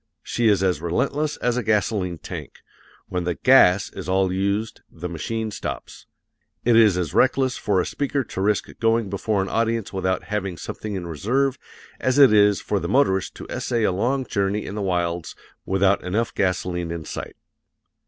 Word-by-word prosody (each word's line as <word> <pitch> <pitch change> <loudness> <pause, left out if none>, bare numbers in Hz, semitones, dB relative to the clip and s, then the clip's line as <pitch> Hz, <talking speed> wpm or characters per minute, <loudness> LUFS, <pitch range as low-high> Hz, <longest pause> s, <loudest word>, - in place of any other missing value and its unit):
She 120 -1 0
is 100 -3 +3
as 90 -5 +1
relentless 140 - -1
as 125 0 0
a 125 - -1
gasoline 100 -4 0
tank - - -9 0.5
when 90 -1 -2
the 85 0 -1
"gas" 100 -8 +5
is 85 - -7
all 95 0 +2
used 100 +3 -1
the 85 +2 -7
machine 110 +6 -3
stops. - - -7 0.6
It 120 -1 +4
is 110 -5 +6
as 85 -5 -2
reckless 130 0 +3
for 100 -3 0
a - - +1
speaker 140 -1 -1
to 95 - -6
risk 100 -1 +1
going 115 -3 +1
before 100 0 0
an - - -5
audience 115 -2 -1
without 95 -1 -1
having 100 -4 -3
something 105 +5 -6
in 90 -2 -4
reserve 125 - 0 0.4
as 130 +1 +1
it 140 -6 +7
is 105 -1 +5
for 100 - -1
the - - -4
motorist 95 -9 +2
to - - -9
essay 120 -3 -2
a 105 - +3
long 125 +8 0
journey 100 -1 -1
in - - -6
the 105 - -3
wilds 85 -3 -2 0.3
without 95 +1 +2
enough 105 +6 -1
gasoline 90 -3 -1
in 85 -2 -5
sight. - - -6
100 Hz, 180 wpm, -23 LUFS, 90-115 Hz, 0.6 s, it